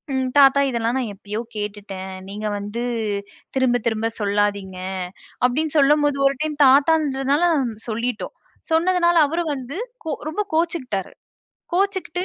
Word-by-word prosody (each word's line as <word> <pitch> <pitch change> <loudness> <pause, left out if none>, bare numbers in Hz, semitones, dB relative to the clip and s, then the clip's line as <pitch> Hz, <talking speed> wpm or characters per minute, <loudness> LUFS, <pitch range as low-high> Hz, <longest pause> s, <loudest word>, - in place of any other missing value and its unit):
ம் 260 -1 0
"தாத்தா, 280 0 +6
இதெல்லாம் 235 +2 0
நான் 235 -5 -3
எப்பயோ 210 +2 -5 0.2
கேட்டுட்டேன். 200 -2 -5 0.2
நீங்க 210 +1 -4
வந்து 205 +4 -4 0.7
திரும்ப 245 -3 +2
திரும்ப 225 0 0
சொல்லாதீங்க." 200 -2 0 0.7
அப்டின்னு 305 +5 -2
சொல்லும்போது 290 0 +3
ஒரு 275 - 0
டைம் 300 -1 -2
தாத்தான்றதால 280 +1 +3 0.4
சொல்லிட்டோம். 230 +1 -3 0.4
சொன்னதுனால 345 +1 +3
அவரு 335 +1 -1
வந்து 265 +6 -6 0.3
கோ 315 - -2 0.2
ரொம்ப 415 +7 -1
கோச்சிக்கிட்டாரு. 300 - -1 0.6
கோச்சிக்கிட்டு 375 -2 0
265 Hz, 120 wpm, -22 LUFS, 215-315 Hz, 0.7 s, தாத்தா